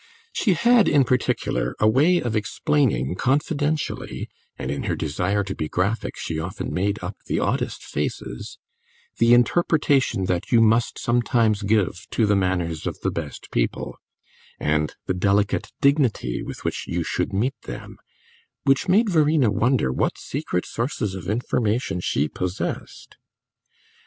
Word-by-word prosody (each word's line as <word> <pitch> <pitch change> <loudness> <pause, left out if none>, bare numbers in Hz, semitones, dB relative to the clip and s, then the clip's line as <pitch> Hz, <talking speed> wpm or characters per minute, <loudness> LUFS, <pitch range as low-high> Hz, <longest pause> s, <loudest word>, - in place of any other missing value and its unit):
She 200 - +2
had, 235 +5 +4
in 140 - +5
particular, 125 0 0
a 105 - +4
way 145 +11 +4
of 120 -8 -1
explaining 110 - +1
confidentially 145 - -1 0.3
and 65 - -3
in 70 - -3
her - - +1
desire 90 +7 -1
to 95 0 -4
be 80 -4 -4
graphic 100 +5 -1
she 80 - -3
often 90 +5 -4
made 100 +3 0
up 90 +2 -5
the - - 0
oddest - - -1
faces - - -4 0.6
the 115 +1 +6
interpretation 135 - +2
that 90 +7 -2
you 120 - +6
must 115 +1 +3
sometimes 120 -3 +2
give 100 -3 0
to 115 - +1
the 105 0 +3
manners 90 -4 -1
of - - -4
the - - 0
best 80 -4 -6
people, - - -1 0.6
and 75 0 0
the - - 0
delicate 100 +2 +1
dignity 135 - +2
with - - -8
which - - -2
you 85 0 -1
should - - -2
meet 115 +8 0
them, - - -8 0.7
which 135 0 +2
made 210 +6 +4
Verena 155 - +3
wonder 115 - +2
what - - 0
secret 135 -10 -3
sources 115 -4 -2
of 95 -1 -6
information 110 -3 0
she 75 -4 0
possessed. 90 +4 -5
110 Hz, 145 wpm, -23 LUFS, 90-135 Hz, 0.7 s, the